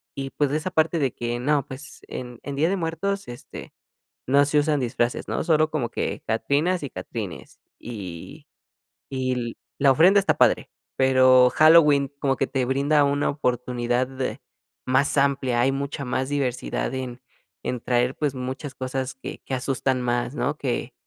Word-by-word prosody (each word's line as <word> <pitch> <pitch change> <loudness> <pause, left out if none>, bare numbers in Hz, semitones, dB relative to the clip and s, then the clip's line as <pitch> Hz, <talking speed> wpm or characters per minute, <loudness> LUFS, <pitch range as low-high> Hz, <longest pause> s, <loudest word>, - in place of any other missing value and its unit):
y 135 -1 -4
pues, 145 0 0
esa 155 +5 -1
parte 165 -1 +1
de 135 -3 +1
que, 120 0 -3
no 140 +2 +1
pues, 140 +2 -10
en 125 -2 -7
en 140 - -5
Día 155 +4 +2
de 195 - +1
Muertos, 190 +4 -2
este, 120 0 -10 0.5
no 140 +2 +5
se 145 +1 +1
usan 145 -1 +2
disfraces, 120 -1 -1
¿no?, - - -2
solo 155 -2 +3
como 145 -7 -1
que - - -3
catrinas 145 +10 +1
y 140 - -5
catrines, 105 -7 -7 0.2
y 95 -8 -8 0.7
y 130 -3 -2 0.2
la 140 -1 +5
ofrenda 180 +9 +6
está 195 - +1
padre. - - +3 0.3
Pero, 130 -1 +6
Halloween 150 -3 +5
como 135 -1 +1
que 135 - -1
te 130 -2 -1
brinda 140 +3 +2
una 140 +1 +1
oportunidad 125 -2 -1
de 130 0 -4 0.5
más 135 +3 +2
amplia, 135 -3 +1
hay 130 +2 +3
mucha 140 +1 -3
más 130 +1 -2
diversidad 135 -3 -2
en 130 -1 -5 0.4
en 125 - -2
traer, 125 +2 +1
pues, 145 -3 -1
muchas 130 +2 -5
cosas 130 0 -3
que 130 - -8
que - - -5
asustan 130 0 0
más, 120 0 -1
¿no?, 145 +1 -1
que 125 -2 -3
135 Hz, 165 wpm, -24 LUFS, 125-145 Hz, 0.7 s, ofrenda